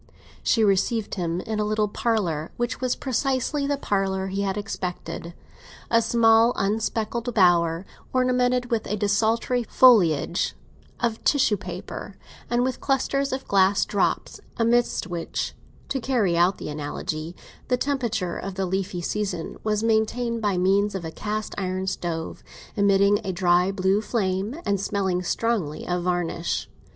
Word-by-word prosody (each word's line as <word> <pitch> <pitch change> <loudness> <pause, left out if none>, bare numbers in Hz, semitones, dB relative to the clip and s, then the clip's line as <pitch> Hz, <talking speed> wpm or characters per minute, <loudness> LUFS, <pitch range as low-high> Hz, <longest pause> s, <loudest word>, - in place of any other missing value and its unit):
She 225 - +2
received 205 +2 +1
him 175 -2 -2
in 220 +1 -3
a - - +2
little 215 0 +1
parlour, 195 -9 -1
which 240 +1 -2
was 255 -1 +1
precisely 270 +2 -1
the 285 0 0
parlour 195 -5 -1
he 195 +1 -2
had 195 0 -1
expected: 180 -4 -5 0.6
a 230 - +5
small 230 0 +4
unspeckled 220 +3 -1
bower, 175 -2 +3 0.3
ornamented 250 -1 +1
with 230 -2 0
a 210 - -1
desultory 220 +4 +1
foliage 185 - +4 0.4
of 230 -2 -1
tissue 265 -7 +3
paper, 185 +1 -7 0.3
and 240 +1 +2
with 260 0 -2
clusters 275 0 0
of 260 +1 -4
glass 195 0 +3
drops, 200 - -1 0.2
amid 240 0 +3 0.2
which—to 175 +8 -5
carry 230 -9 +1
out 175 +3 +3
the - - -6
analogy—the 155 - -4
temperature 235 -10 -1
of 195 -1 -5
the 195 0 -1
leafy 185 -1 -2
season 190 -2 -3
was 215 0 0
maintained 230 +1 +1
by 205 -4 +1
means 195 +2 +2
of 180 -3 -4
a 160 - -5
cast 215 +4 -4
iron 185 0 -2
stove, 170 -3 -3 0.3
emitting 200 0 +4
a 195 - -2
dry 180 +1 +3
blue 195 +1 +1
flame, 210 - -1
and 200 -1 0
smelling 190 -3 0
strongly 180 -5 -1
of 180 0 0
varnish. 175 -1 -1
205 Hz, 140 wpm, -24 LUFS, 185-230 Hz, 0.6 s, a